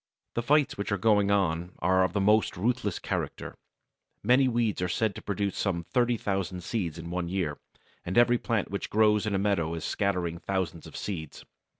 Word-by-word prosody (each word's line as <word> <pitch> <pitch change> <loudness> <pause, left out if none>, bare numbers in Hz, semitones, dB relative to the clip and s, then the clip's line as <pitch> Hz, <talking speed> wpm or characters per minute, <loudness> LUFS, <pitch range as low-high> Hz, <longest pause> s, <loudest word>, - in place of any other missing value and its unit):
The 120 - -1
fights 145 -1 +2
which 100 - -3
are 100 - +2
going 105 0 +3
on 90 -3 +1
are 95 +2 +3
of 95 -2 0
the - - +1
most 105 +1 +3
ruthless 105 -1 0
character. - - -4 0.7
Many 130 +2 +5
weeds 115 -5 0
are 90 - 0
said 110 +3 0
to - - -9
produce 100 -1 -2
some 85 -4 -1
30,000 100 -6 -1
seeds 85 -9 -2
in 85 0 -7
one 90 -1 -2
year, 85 -6 -2 0.4
and 90 +4 -3
every 120 0 +5
plant 115 -6 -1
which 100 - -3
grows 105 0 +3
in 100 - 0
a - - +2
meadow 95 -5 0
is 80 - -5
scattering 90 -5 -1
thousands 95 -4 -3
of - - -9
seeds. 80 -7 -6
100 Hz, 190 wpm, -28 LUFS, 90-110 Hz, 0.7 s, Many